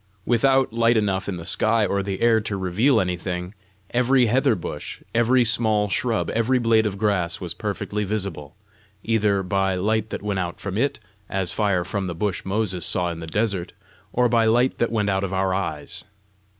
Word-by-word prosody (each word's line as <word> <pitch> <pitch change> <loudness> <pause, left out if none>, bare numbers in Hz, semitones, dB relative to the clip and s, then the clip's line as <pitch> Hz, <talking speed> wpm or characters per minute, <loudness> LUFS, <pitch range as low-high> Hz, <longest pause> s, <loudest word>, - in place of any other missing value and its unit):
Without 130 +1 +3
light 115 0 +3
enough 100 -2 0
in 95 - -2
the 85 -1 -8
sky 110 +4 +2
or 100 +1 0
the 95 -1 -4
air 115 -1 +4
to 105 -2 -3
reveal 95 +9 +2
anything, 90 0 -3 0.4
every 125 +1 +3
heather 130 +2 +3
bush, 85 -5 -6
every 120 +2 +3
small 110 -2 +2
shrub, 110 +6 0
every 115 +3 +2
blade 115 -2 +3
of 100 -1 -4
grass 95 -5 0
was - - -5
perfectly 105 0 -3
visible 95 -8 -4 0.5
either 105 -3 +1
by 95 0 0
light 110 +3 0
that - - -5
went 100 -2 -1
out 90 -1 -4
from 100 -2 -5
it, 140 +6 0 0.3
as 95 -3 0
fire 100 -3 +1
from 100 +1 -3
the 85 - -4
bush 100 +1 -2
Moses 95 -3 -1
saw 90 +2 0
in 85 - -7
the 80 - -7
desert, 100 -1 -1 0.4
or 125 0 +3
by 115 -1 +3
light 120 +3 +2
that 120 - +1
went 105 -3 0
out 95 0 0
of 95 -1 -3
our 95 0 +1
eyes. 75 -6 -3
105 Hz, 190 wpm, -23 LUFS, 95-115 Hz, 0.5 s, air